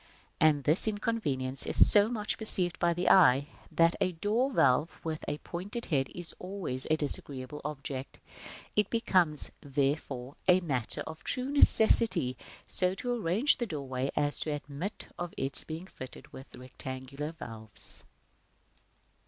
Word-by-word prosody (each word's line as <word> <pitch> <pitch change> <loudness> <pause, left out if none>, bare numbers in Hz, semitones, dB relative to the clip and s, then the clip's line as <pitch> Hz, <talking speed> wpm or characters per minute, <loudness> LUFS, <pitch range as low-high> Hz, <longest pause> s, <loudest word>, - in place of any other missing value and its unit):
And 150 -3 +2
this 155 +9 +6
inconvenience 150 - -2
is - - +3
so 205 0 +5
much 215 -3 -4
perceived 185 -5 0
by 175 - +1
the 175 +2 -3
eye, 145 -5 +4 0.2
that 165 0 +2
a 185 -1 0
door 220 +10 -1
valve 145 - +1
with 160 -1 -6
a 145 - -4
pointed 195 +9 -7
head 135 -2 0
is 175 -1 -3
always 180 -9 +1
a 155 - +1
disagreeable 145 -1 -3
object. 140 -2 -7 0.6
It 210 -1 0
becomes, 180 -9 -1
therefore, 135 -2 -4
a 180 0 +4
matter 130 -9 -3
of 160 0 -11
true 255 +2 -3
necessity 220 - +8 0.3
so 185 0 0
to 245 +5 -4
arrange 220 - 0
the 240 - -3
doorway 135 -5 -5
as 145 0 0
to - - -4
admit 145 +6 -6
of 175 -1 -6
its 135 +1 0
being 160 +3 -8
fitted 130 -8 -13
with 130 - -13
rectangular 130 +3 -8
valves. 110 -8 -7
155 Hz, 145 wpm, -28 LUFS, 135-190 Hz, 0.6 s, necessity